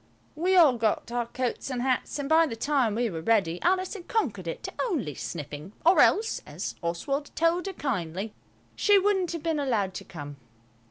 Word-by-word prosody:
We 360 +5 +2
all 295 -9 +6
got 220 +1 0
our 240 -1 -1
coats 250 +2 -3
and 250 -2 -2
hats, 255 +1 0
and 285 -1 -3
by 320 +2 +5
the 230 - -4
time 250 -3 +1
we 240 +1 +1
were 165 -2 -5
ready 180 -3 +1
Alice 370 +1 +1
had 380 -5 -9
conquered 225 - -1
it 165 - -5
to - - -5
only 285 - -1
sniffing, 150 +5 -7
or 350 +3 +6
else, 445 +2 +3
as - - -5
Oswald 275 - -2
told 335 +3 +1
her 390 - -4
kindly, 200 - -3 0.4
she 410 -1 +5
wouldn't 385 -3 +2
have 335 -3 -5
been 325 -2 0
allowed 220 -9 0
to - - -6
come. 145 -4 -9
255 Hz, 195 wpm, -27 LUFS, -, 0.4 s, all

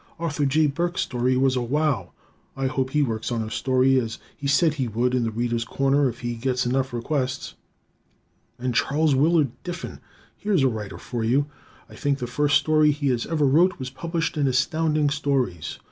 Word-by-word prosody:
Arthur 155 -3 -1
J. 155 +3 +3
Burks' 170 +5 -1
story 125 +1 0
was 130 0 +2
a 125 - 0
wow. 125 - 0 0.5
I 135 - -1
hope 130 0 -1
he 150 +2 +2
works 115 -2 -3
on 115 -2 -1
a 110 - -7
story 130 +1 +2
as 115 -2 -4 0.2
he 140 - -5
said 145 +3 +3
he 135 -5 -2
would 120 +3 0
in 125 -2 +1
"The - - 0
Readers' 115 +1 -1
Corner" 135 +3 +1
if 120 0 -9
he 120 0 -2
gets 125 +2 -1
enough 130 +2 0
requests. 130 +2 -2 1.0
And 125 0 -2
Charles 150 +5 +2
Willard 150 0 +3
Diffin! 175 0 -6 0.4
Here's 200 -8 +1
a - - +5
writer 110 -5 -4
for 120 -2 -4
you. 130 +6 +2 0.4
I - - -15
think 145 -2 0
the 125 - -4
first 145 +4 +2
story 155 -1 +3
he 140 -3 +1
ever 155 -3 +1
wrote 165 +7 +4
was 130 -2 -6
published 165 +3 -3
in 145 -2 +2
Astounding 150 +3 +1
Stories. 130 - -1
135 Hz, 190 wpm, -24 LUFS, 125-150 Hz, 1.0 s, a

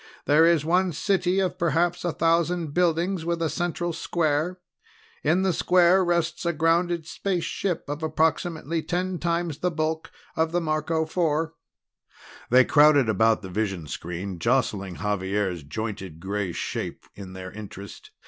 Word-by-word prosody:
There 155 +3 +5
is 165 -3 +3
one 180 +2 +2
city 185 +2 +1
of 185 -2 -1
perhaps 170 +1 +1
a 175 - 0
thousand 165 -1 +1
buildings 175 +1 +1
with 170 0 -1
a 165 -2 0
central 175 0 -2
square. 160 +2 -1 0.6
In 170 +5 +2
the 190 -2 +2
square 180 +3 +4
rests 170 -1 0
a 170 0 0
grounded 165 +1 +1
spaceship 180 0 -2
of 145 +2 -4
approximately 160 +1 0
ten 180 +1 -2
times 170 -3 -1
the 180 - +1
bulk 160 -1 -2 0.3
of 160 0 +1
the 175 - +2
Marco 160 0 0
Four." 160 -1 0 1.0
They 130 +1 +6
crowded 145 -5 +5
about 110 +1 +3
the 95 - -7
vision 95 -5 -2
screen, 90 +4 -5
jostling 105 -6 0
Xavier's 95 -2 -1
jointed 95 0 -6
gray 100 +1 -2
shape - - -4
in 95 -2 -10
their 95 0 -8
interest. 100 -1 -10
160 Hz, 145 wpm, -25 LUFS, 110-175 Hz, 1.0 s, They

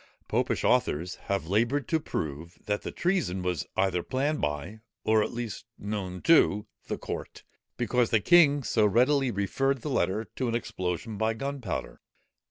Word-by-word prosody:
Popish - - 0
authors 85 +5 +2 0.2
have 100 -4 0
laboured 120 - +1
to 160 - +2
prove, 80 - -5
that 105 0 -1
the - - -5
treason 170 - 0
was 90 -5 -2
either 95 -2 +2
planned 140 - -1
by, 75 +9 -3 0.2
or 110 0 +4
at - - -1
least 120 -2 -5
known 100 -3 -4
to, 105 -10 +5 0.2
the - - -2
court, - - -6 0.3
because 120 0 +1
the 110 - +4
king 145 - +5
so 110 -1 +2
readily 125 +6 +3
referred 125 +6 0
the 150 - -3
letter 105 0 0
to 130 - 0
an 115 - -1
explosion 95 -1 -3
by 110 0 +1
gunpowder. 135 - -4
110 Hz, 160 wpm, -28 LUFS, 95-135 Hz, 0.3 s, to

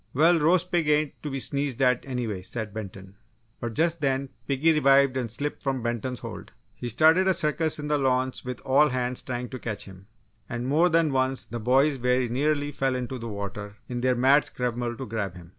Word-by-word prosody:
"Well, 165 +4 +5
roast 180 +4 +2
pig 170 -4 +1
ain't 150 -1 +1
to 150 - -4
be 135 -1 -3
sneezed 140 -1 0
at, 125 -2 +2
anyway," 120 -7 -3
said 105 +2 -5
Benton. 95 -2 -8 0.4
But 115 -2 -5
just 165 0 +1
then, 135 -1 0 0.2
piggy 145 +4 +3
revived 140 -3 +4
and 125 -3 -2
slipped 145 +6 -4
from 135 -3 -2
Benton's 120 +2 -3
hold. - - -8 0.2
He 120 - -6
started 160 - +4
a 190 - +4
circus 155 +1 +1
in 150 - -5
the 150 0 +1
launch 130 -1 0
with 125 0 -6
all 145 +3 +4
hands 125 -1 -2
trying 125 -1 -5
to 130 - -7
catch 110 -4 -4
him, 95 0 -14 0.4
and 120 -1 -4
more 160 +6 +3
than 165 -3 +2
once, 130 0 0
the 120 - -6
boys 135 +5 +3
very 125 0 +1
nearly 145 +4 0
fell 135 -2 -1
into 125 0 -4
the 115 0 -6
water 100 0 -6
in 120 -1 -4
their 130 0 +2
mad 135 +4 +5
scramble 120 -1 -3
to 135 - -5
grab 105 -5 -4
him. 85 -1 -12
130 Hz, 210 wpm, -26 LUFS, 120-145 Hz, 0.4 s, Well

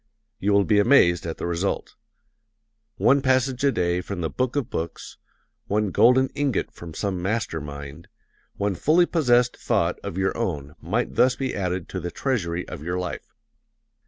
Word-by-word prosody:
You 105 - +1
will 100 0 +5
be 105 +1 +3
amazed 85 -8 +4
at 80 - -4
the - - -4
result. 85 +3 -2 1.0
One 140 +1 +4
passage 130 0 +1
a 140 - +4
day 90 -4 0
from 95 -1 -5
the 80 - -2
Book 130 0 -1
of 145 -5 0
Books, 80 0 -5 0.5
one 105 -1 0
golden 130 +5 +5
ingot 140 -6 -1
from 85 -2 -10
some 95 -3 -2
master 95 -4 -2
mind, 70 +2 -9 0.5
one 100 0 -1
fully 160 - +3
possessed 125 -8 +2
thought - - 0
of 85 - -5
your 95 0 0
own 75 -11 -3
might 105 +10 -1
thus 125 0 +4
be 135 -1 -3
added 90 -3 -2
to 95 - -4
the 90 0 -4
treasury 90 -9 -2
of - - -8
your 90 +3 -3
life. 90 -1 -6
100 Hz, 170 wpm, -24 LUFS, 85-125 Hz, 1.0 s, will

